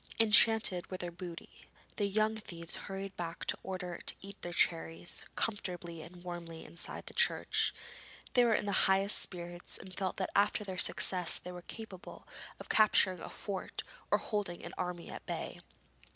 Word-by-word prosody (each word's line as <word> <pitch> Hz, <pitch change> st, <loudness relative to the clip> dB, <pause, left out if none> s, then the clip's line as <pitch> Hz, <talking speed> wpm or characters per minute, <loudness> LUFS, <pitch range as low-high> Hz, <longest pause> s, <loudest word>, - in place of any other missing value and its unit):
Enchanted 220 Hz, -4 st, +6 dB
with 185 Hz, -, -5 dB
their 175 Hz, -1 st, -3 dB
booty, 175 Hz, -1 st, -9 dB, 0.3 s
the 205 Hz, -, +2 dB
young 215 Hz, +2 st, +2 dB
thieves 170 Hz, -6 st, -4 dB
hurried 195 Hz, 0 st, -5 dB
back 165 Hz, -1 st, -4 dB
in -, -, +1 dB
order 180 Hz, -2 st, -4 dB
to -, -, 0 dB
eat 195 Hz, +1 st, -8 dB
the 175 Hz, -, -3 dB
cherries 165 Hz, 0 st, 0 dB
comfortably 180 Hz, -6 st, -3 dB
and 175 Hz, +2 st, -11 dB
warmly 170 Hz, -2 st, -6 dB
inside 170 Hz, -, -4 dB
the -, -, -7 dB
church. -, -, +2 dB, 0.6 s
They 245 Hz, -, +6 dB
were 230 Hz, -2 st, +5 dB
in -, -, 0 dB
the 200 Hz, -, 0 dB, 0.2 s
highest 195 Hz, +2 st, +7 dB
spirits 175 Hz, -1 st, -2 dB
and 185 Hz, -, -10 dB
felt 190 Hz, -2 st, -2 dB
that 190 Hz, -, -1 dB
after 205 Hz, +1 st, +3 dB
their 190 Hz, -2 st, -4 dB
success 180 Hz, -2 st, +2 dB
they 180 Hz, -, -8 dB
were 180 Hz, 0 st, -7 dB
capable 195 Hz, -1 st, -9 dB, 0.3 s
of -, -, -9 dB
capturing 190 Hz, -4 st, +5 dB
a -, -, -7 dB
fort 195 Hz, -3 st, -4 dB, 0.3 s
or -, -, +5 dB
holding 205 Hz, -5 st, -3 dB
an 170 Hz, -, -7 dB
army 180 Hz, -2 st, -3 dB
at -, -, -7 dB
bay. -, -, -3 dB
185 Hz, 170 wpm, -34 LUFS, 175-200 Hz, 0.6 s, highest